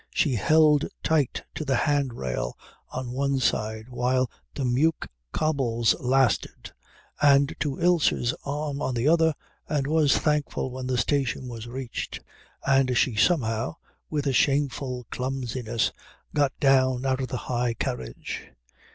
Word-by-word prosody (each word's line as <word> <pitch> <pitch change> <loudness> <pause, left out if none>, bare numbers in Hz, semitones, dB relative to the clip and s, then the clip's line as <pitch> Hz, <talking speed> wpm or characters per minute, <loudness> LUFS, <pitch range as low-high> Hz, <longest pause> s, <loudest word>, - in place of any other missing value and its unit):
She 145 - +1
held 150 +6 +4 0.2
tight 150 -5 +1
to - - -4
the 135 -3 +1
hand 140 -2 +1
rail 65 - -3 0.3
on 130 -1 -4
one 140 +1 0
side 110 -3 -1
while 130 0 0 0.2
the 140 - -2
Meuk 140 +6 +1 0.2
cobbles 130 -7 +1
lasted 130 -2 +1 0.5
and 140 -1 +5
to 140 -3 -2
Ilse's 170 -8 +2
arm 145 0 -3
on 130 - -1
the 120 +4 +1
other, 160 -1 +4 0.3
and 145 -3 0
was 150 -1 +3
thankful 150 -3 0
when 130 0 -5
the 130 -1 0
station 135 -1 0
was 115 -1 -7
reached 125 0 -5 0.5
and 135 -2 +3
she 125 - +3
somehow, 115 - +1 0.3
with 150 -2 -2
a 135 - +1
shameful 135 -2 +1
clumsiness, 125 -3 -2 0.4
got 140 -2 +1
down 130 -2 +3
out 130 0 +1
of 130 - -2
the 125 - -3
high 120 -1 0
carriage. - - -5
130 Hz, 140 wpm, -26 LUFS, 125-145 Hz, 0.5 s, and